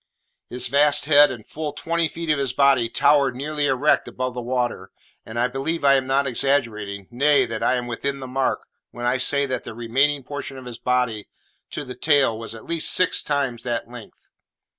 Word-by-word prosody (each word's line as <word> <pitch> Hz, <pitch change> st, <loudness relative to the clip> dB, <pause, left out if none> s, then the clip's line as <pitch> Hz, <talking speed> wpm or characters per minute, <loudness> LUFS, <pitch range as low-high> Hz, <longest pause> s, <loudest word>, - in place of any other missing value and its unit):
His 125 Hz, -, -1 dB
vast 145 Hz, +1 st, +3 dB
head 145 Hz, -1 st, +6 dB
and 120 Hz, -4 st, -8 dB
fully 150 Hz, -1 st, -5 dB
twenty 170 Hz, 0 st, 0 dB
feet 165 Hz, +1 st, -3 dB
of 150 Hz, -, +1 dB
his 135 Hz, -3 st, -1 dB
body 135 Hz, -4 st, +3 dB
towered 140 Hz, 0 st, +3 dB
nearly 145 Hz, +2 st, -2 dB
erect 135 Hz, +3 st, +2 dB
above 130 Hz, 0 st, -4 dB
the 125 Hz, -, -5 dB
water, 120 Hz, -6 st, -2 dB, 0.4 s
and 110 Hz, -, -7 dB
I 120 Hz, +1 st, +2 dB
believe 140 Hz, +5 st, -3 dB
I 140 Hz, -, +6 dB
am 135 Hz, -1 st, +1 dB
not 135 Hz, +1 st, +2 dB
exaggerating, 115 Hz, -7 st, -1 dB
nay, 145 Hz, +4 st, +3 dB
that 110 Hz, -1 st, -5 dB
I 130 Hz, -, +2 dB
am 125 Hz, -1 st, -3 dB
within 140 Hz, +4 st, -3 dB
the 130 Hz, -, -7 dB
mark, 130 Hz, +1 st, -1 dB, 0.2 s
when 120 Hz, +1 st, -7 dB
I 125 Hz, +1 st, +1 dB
say 140 Hz, +2 st, +2 dB
that 130 Hz, -2 st, -3 dB
the 115 Hz, -, -9 dB
remaining 135 Hz, +5 st, 0 dB
portion 140 Hz, 0 st, -7 dB
of 130 Hz, -, -10 dB
his 120 Hz, -1 st, -8 dB
body, 125 Hz, -4 st, -1 dB, 0.4 s
to -, -, -6 dB
the 125 Hz, -, -7 dB
tail, 140 Hz, -5 st, +2 dB
was 115 Hz, 0 st, -7 dB
at 110 Hz, -, -12 dB
least 170 Hz, -1 st, +1 dB
six 185 Hz, -, +3 dB
times 135 Hz, -5 st, -1 dB
that 120 Hz, -1 st, -3 dB
length. 120 Hz, -4 st, -13 dB
130 Hz, 205 wpm, -22 LUFS, 120-145 Hz, 0.4 s, head